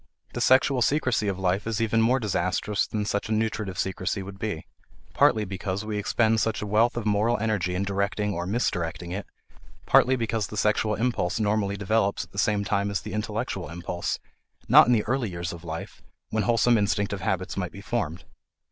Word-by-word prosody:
The - - -3
sexual 130 0 +4
secrecy 130 -5 +1
of 95 -2 -1
life 95 +2 0
is 115 -2 -1
even 115 0 +2
more 125 +4 +3
disastrous 105 -1 0
than 105 -1 -2
such 105 0 -2
a - - -3
nutritive 110 -3 -1
secrecy 95 +1 -2
would 95 0 -10
be; 105 -7 -3 0.5
partly 110 -1 +4
because 95 +1 -4
we 105 -1 -2
expend 110 +2 +2
such 110 0 0
a - - -4
wealth 110 +4 +2
of 115 - -3
moral 105 +3 +2
energy 100 -5 -1
in 95 - 0
directing 100 +1 -1
or 85 0 -3
misdirecting 90 -5 -2
it, 100 +2 -4 0.6
partly 130 +1 +5
because 115 -4 -1
the 105 - -8
sexual 105 +1 +2
impulse 115 -5 0
normally 105 -1 0
develops 100 0 +1
at - - -16
the 100 - -5
same 105 0 +2
time 100 0 0
as 100 -1 -1
the 105 - -7
intellectual 105 -8 -3
impulse, 85 +1 -3 0.5
not - - +8
in 125 - +4
the 110 -3 +2
early 120 -1 -1
years 85 -1 -4
of 85 -1 -10
life, 80 -1 -7 0.3
when 110 - +1
wholesome 120 -1 +4
instinctive 100 -1 0
habits 95 0 -2
might 90 -3 -3
be 100 - -10
formed. 90 -6 -3
105 Hz, 190 wpm, -26 LUFS, 95-110 Hz, 0.6 s, not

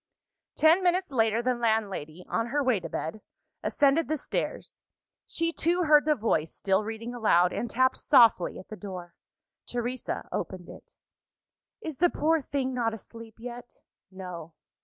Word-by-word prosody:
Ten 320 +4 +5
minutes 365 -1 +1
later, 225 -2 +2
the 255 +1 +2
landlady, 205 -8 -1
on 230 - -1
her 285 +4 0
way 255 -6 +2
to 175 - -7
bed, 210 +7 -4 0.4
ascended 290 +3 +2
the 310 - 0
stairs. - - -4 0.5
She 330 0 -1
too 350 +3 +1
heard 300 -2 +5
the 305 -1 +3
voice, 165 - 0
still 195 +1 +1
reading 225 +2 -6
aloud 180 -7 +3
and 240 - -3
tapped 260 +3 +2
softly 225 -7 +4
at 185 - -11
the 215 - -6
door. 185 -4 -8 0.5
Teresa 245 +1 -3
opened - - -5
it. - - -14 0.9
"Is 315 -8 -6
the 350 +1 +5
poor 320 0 +1
thing 265 -1 -2
not 230 -3 0
asleep 225 +1 -12
yet?" 245 +1 -9 0.3
"No." 180 -4 -8
235 Hz, 155 wpm, -28 LUFS, 205-285 Hz, 0.9 s, Ten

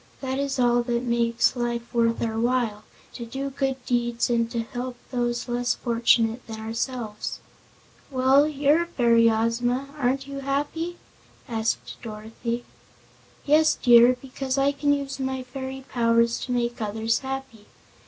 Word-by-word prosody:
That 265 0 -3
is 280 -1 -1
all 240 -1 +3
that 235 0 -1
makes 235 0 +2
life 240 -1 -3
worth 230 -1 +2
our 225 -1 -1
while 230 -3 0 0.3
to 240 - -6
do 270 +4 -4
good 265 -2 -2
deeds 240 -1 0
and 230 -1 +1
to 235 -1 -2
help 250 +1 -5 0.2
those 240 -1 -1
less 245 0 0
fortunate 230 -1 +2
than 220 -1 -7
ourselves." 225 0 -4 0.7
"Well, 265 +2 +4
you're 295 +2 +3
a 340 - -3
fairy, 235 -7 +4
Ozma. 240 +4 0
Aren't 265 +1 0
you 275 0 -6
happy?" 295 +5 -2 0.5
asked 225 -2 -2
Dorothy. 230 +2 -5 0.8
"Yes, 310 +2 +4
dear, 240 +1 +7
because 265 0 -4
I 275 +1 +3
can 285 +1 0
use 280 -1 -2
my 265 -1 -2
fairy 265 +1 -7
powers 230 -1 +2
to 250 - -5
make 240 -1 -1
others 220 +2 0
happy. 265 -5 -6
245 Hz, 145 wpm, -25 LUFS, 230-270 Hz, 0.8 s, dear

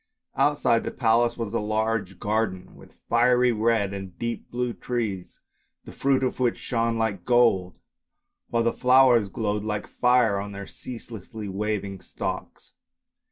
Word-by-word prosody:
Outside 145 -5 +2
the - - -2
palace 120 0 +2
was 115 -4 -4
a - - +1
large 110 -2 -1
garden, 105 -4 -2
with - - -17
fiery 125 +1 +4
red 110 -3 +1
and 95 -3 -7
deep 115 0 -4
blue 125 0 -2
trees, 110 -8 -4 0.4
the - - -9
fruit 135 -1 +1
of 130 - -1
which 125 -2 +1
shone 115 -1 -1
like 110 -5 -1
gold, 115 -7 +3 0.7
while 115 -1 +1
the 115 - +1
flowers 125 -4 +5
glowed 105 0 -2
like 105 -1 -3
fire 125 -5 +2
on 100 0 -6
their 100 0 -7
ceaselessly 110 -3 -8
waving 100 -1 -3
stalks. - - -6
115 Hz, 145 wpm, -25 LUFS, 100-120 Hz, 0.7 s, flowers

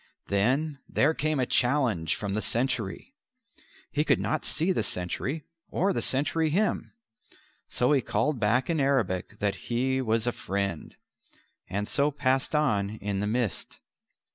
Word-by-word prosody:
Then 135 +9 +1
there 150 +3 +3
came 155 -2 0
a 130 - +2
challenge 120 - +2
from 100 -2 -3
the 105 - 0
sentry. 120 - -1 0.8
He 150 - +1
could - - +3
not 155 - -1
see 170 +4 0
the - - +1
sentry 125 - -2 0.3
or 195 +2 +1
the - - -1
sentry 155 +4 +2
him. 205 +8 0 0.7
So 125 +3 +1
he 140 -3 +4
called 150 0 0
back 120 +5 +2
in 165 -2 0
Arabic 115 -8 0
that 100 -1 -2
he 130 +2 +1
was 115 -2 +1
a 120 - +2
friend, 100 -6 -3 0.7
and 105 +3 -2
so 140 +6 +2
passed 135 0 0
on 110 -8 +1
in 100 -1 -2
the 105 - -1
mist. 115 -4 -2
125 Hz, 150 wpm, -28 LUFS, 105-150 Hz, 0.8 s, he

